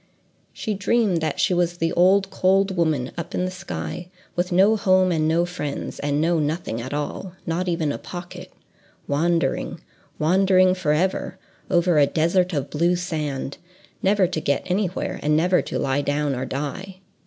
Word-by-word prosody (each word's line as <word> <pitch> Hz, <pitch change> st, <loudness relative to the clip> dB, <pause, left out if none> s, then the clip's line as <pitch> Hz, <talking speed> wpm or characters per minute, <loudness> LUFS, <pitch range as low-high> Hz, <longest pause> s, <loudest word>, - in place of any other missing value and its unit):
She 215 Hz, -, -3 dB
dreamed 205 Hz, -3 st, +1 dB
that 155 Hz, -2 st, -2 dB
she -, -, +2 dB
was 175 Hz, -1 st, 0 dB
the 165 Hz, -1 st, 0 dB
old 195 Hz, +2 st, +4 dB
cold 195 Hz, +1 st, +2 dB
woman 155 Hz, -7 st, 0 dB
up 170 Hz, -, -5 dB
in 180 Hz, -, 0 dB
the 185 Hz, -, -3 dB
sky, 185 Hz, -1 st, -6 dB, 0.3 s
with 180 Hz, +1 st, -1 dB
no 195 Hz, +5 st, +5 dB
home 185 Hz, -3 st, +3 dB
and 155 Hz, -2 st, +1 dB
no 165 Hz, +2 st, +2 dB
friends, 150 Hz, -5 st, -5 dB
and 145 Hz, 0 st, 0 dB
no 165 Hz, +1 st, +2 dB
nothing 150 Hz, -6 st, -2 dB
at 130 Hz, -, -6 dB
all, 150 Hz, +5 st, -4 dB
not 170 Hz, +3 st, -1 dB
even 165 Hz, -4 st, 0 dB
a -, -, -4 dB
pocket; 175 Hz, -1 st, -9 dB, 0.6 s
wandering, 165 Hz, 0 st, 0 dB, 0.4 s
wandering 185 Hz, +3 st, +4 dB
forever, 180 Hz, +1 st, 0 dB, 0.3 s
over 175 Hz, -2 st, +3 dB
a 140 Hz, -, +5 dB
desert 175 Hz, +4 st, +1 dB
of 140 Hz, -4 st, -3 dB
blue 170 Hz, +4 st, +2 dB
sand, 155 Hz, -6 st, -3 dB, 0.4 s
never 195 Hz, 0 st, +3 dB
to 170 Hz, -3 st, -2 dB
get 140 Hz, -1 st, 0 dB
to -, -, -5 dB
anywhere, 185 Hz, -1 st, -1 dB
and 150 Hz, +1 st, +2 dB
never 180 Hz, +3 st, +3 dB
to -, -, -4 dB
lie 135 Hz, +1 st, 0 dB
down 145 Hz, 0 st, 0 dB
or 130 Hz, 0 st, -3 dB
die. 150 Hz, +9 st, -5 dB
175 Hz, 170 wpm, -23 LUFS, 150-185 Hz, 0.6 s, no